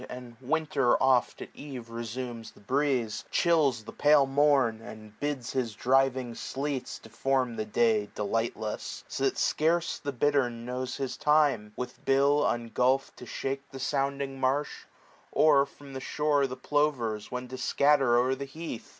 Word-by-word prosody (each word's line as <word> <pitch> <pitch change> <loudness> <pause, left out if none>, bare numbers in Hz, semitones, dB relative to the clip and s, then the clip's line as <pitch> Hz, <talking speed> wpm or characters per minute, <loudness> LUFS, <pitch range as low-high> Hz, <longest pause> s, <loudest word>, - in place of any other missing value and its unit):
And 125 -1 -9
Winter 140 -2 +1
oft 130 -2 +2
at - - -11
eve 125 -5 -9
resumes 115 0 -5
the - - -19
breeze; 130 -1 0
Chills 145 -9 +2
tlie 110 - -11
pale 145 -1 +6
morn, 135 -5 +2
and 110 -1 -12
bids 145 -5 -3
his 120 -5 -2
driving 130 0 +2
sleets 135 +2 -4
20 - - -15
Deform 130 0 0
the' 110 -1 -3
day 110 -1 +2
delightless; 110 +1 -3
so - - -2
that - - 0
scarce 165 +2 +1
The 145 - -4
bittern 125 -3 0
knows 125 +1 -4
his 135 -2 -4
time, 145 -8 +2
with 125 0 -7
bill 140 +2 +3
ungulpht 125 +3 +1
To 125 - -10
Ihake 135 +3 -4
the 135 - -9
sounding 140 0 -2
marsh; 135 +3 -1 0.4
or 140 -3 +4
from 140 0 -14
the 130 - -5
shore 145 0 +1
The 130 0 -7
plovers 125 -8 0
when 125 0 -4
to 130 - -6
scatter 135 -2 +3
o'er 125 +2 +2
the 140 +1 -4
heath. 145 -3 -7
130 Hz, 160 wpm, -28 LUFS, 120-140 Hz, 0.4 s, pale